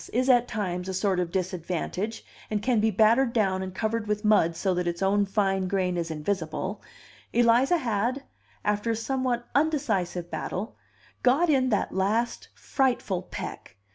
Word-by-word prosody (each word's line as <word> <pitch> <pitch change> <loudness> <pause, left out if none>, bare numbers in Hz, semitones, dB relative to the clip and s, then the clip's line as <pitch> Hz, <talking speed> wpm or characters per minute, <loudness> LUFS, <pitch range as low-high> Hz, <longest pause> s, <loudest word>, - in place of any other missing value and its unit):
is 255 +3 +3
at 245 -1 +4
times 185 -5 -3
a 190 - -3
sort 190 -1 +1
of 175 -2 -1
disadvantage, 185 +3 -3 0.2
and 210 -1 -2
can 245 -2 +2
be 220 +1 +3
battered 230 +5 +4
down 190 -4 +1
and 190 -1 -6
covered 220 +1 -1
with 210 +1 -1
mud 170 -6 +4
so 190 +2 0
that 180 0 -1
its 175 +2 -2
own 200 +1 +2
fine 195 -2 +1
grain 185 -1 0
is 170 -1 -2
invisible) 185 +4 -3 0.5
Eliza 240 +7 +4
had, 245 0 -1 0.4
after 210 +2 0
a 225 - +1
somewhat 245 0 -1
undecisive 210 - 0
battle, 200 +5 -4 0.5
got 290 +7 +4
in 260 -2 +3
that 210 - 0
last 215 +5 0
frightful 245 -9 0
peck! 185 - -8
210 Hz, 160 wpm, -27 LUFS, 185-240 Hz, 0.5 s, at